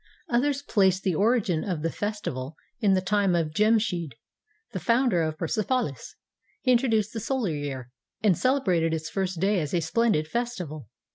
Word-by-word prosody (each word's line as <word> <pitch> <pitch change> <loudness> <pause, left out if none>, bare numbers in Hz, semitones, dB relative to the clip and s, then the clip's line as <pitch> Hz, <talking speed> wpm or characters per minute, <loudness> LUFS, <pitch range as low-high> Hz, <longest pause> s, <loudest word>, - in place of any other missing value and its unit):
Others 275 +3 +1
place 190 -7 +3
the 190 -2 0
origin 200 -3 +2
of 175 -6 -3
the 165 - 0
festival 160 -10 -4 0.2
in 200 -5 +3
the 185 - +1
time 195 -1 +2
of 165 -3 0
Jemshid, 210 - +1 0.6
the 185 - -4
founder 230 0 +2
of 155 -1 -2
Persepo 215 +10 0
lis. 135 - -12 0.5
He 255 - +3
introduced 225 -4 +2
the 225 - -3
solar 230 - -1
year, 135 -4 -5 0.3
and 200 -5 +4
celebrated 180 - +1
its 160 0 -5
first 190 -3 -2
day 195 +2 +2
as 150 0 -2
a - - +3
splendid 165 -2 +1
festival. 180 - -4
190 Hz, 165 wpm, -26 LUFS, 160-230 Hz, 0.6 s, and